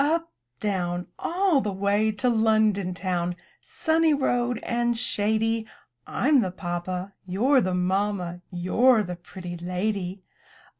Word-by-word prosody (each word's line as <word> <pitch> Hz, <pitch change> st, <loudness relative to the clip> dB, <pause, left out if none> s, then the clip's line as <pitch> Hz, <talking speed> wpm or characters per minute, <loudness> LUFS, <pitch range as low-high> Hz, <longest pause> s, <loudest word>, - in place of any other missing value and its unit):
Up, 330 Hz, +3 st, 0 dB, 0.3 s
down! 180 Hz, -3 st, -1 dB
All 350 Hz, -4 st, +2 dB
the 210 Hz, -, -2 dB
way 200 Hz, +3 st, +1 dB
to 210 Hz, +4 st, -1 dB
London 215 Hz, -5 st, +2 dB
town 180 Hz, -2 st, -1 dB, 0.2 s
— -, -, -40 dB
Sunny 320 Hz, -1 st, +2 dB
road 245 Hz, -3 st, 0 dB
and 240 Hz, 0 st, 0 dB
shady. 220 Hz, 0 st, 0 dB, 0.4 s
Fm 275 Hz, 0 st, +3 dB
the 190 Hz, -, -1 dB
papa, 180 Hz, +1 st, -4 dB
You're 250 Hz, +9 st, +3 dB
the 185 Hz, -3 st, 0 dB
ma'ma. 180 Hz, -1 st, -1 dB
You're 215 Hz, +7 st, +3 dB
the 180 Hz, -2 st, -5 dB
pretty 175 Hz, 0 st, -8 dB
lady! 185 Hz, +1 st, -3 dB
205 Hz, 130 wpm, -26 LUFS, 180-240 Hz, 0.4 s, Fm